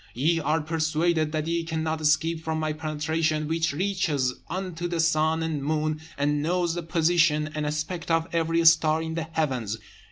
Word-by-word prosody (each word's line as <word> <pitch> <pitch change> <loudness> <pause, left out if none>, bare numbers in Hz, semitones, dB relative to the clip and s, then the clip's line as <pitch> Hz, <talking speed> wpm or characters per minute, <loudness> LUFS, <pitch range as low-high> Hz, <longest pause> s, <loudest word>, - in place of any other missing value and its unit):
ye 160 +7 +2
are 155 +1 +1
persuaded 160 0 0
that 155 -1 -1
ye 170 +1 -1
cannot 160 -1 -2
escape 160 +2 +1
from 160 0 -2
my 155 -1 -1
penetration, 155 0 -1
which 165 +1 0
reaches 150 -6 0 0.2
unto 180 -2 -3
the 170 -1 -3
sun 160 0 +2
and 155 -4 -2
moon, 155 +1 -1 0.2
and 145 +1 +1
knows 175 +2 0
the 175 - -3
position 165 -2 +2
and 150 -1 -2
aspect 155 +3 -3
of 165 0 +2
every 165 0 +1
star 160 -1 +5
in 160 0 -4
the 165 -1 -3
heavens. 125 -9 -1
160 Hz, 170 wpm, -26 LUFS, 155-165 Hz, 0.2 s, star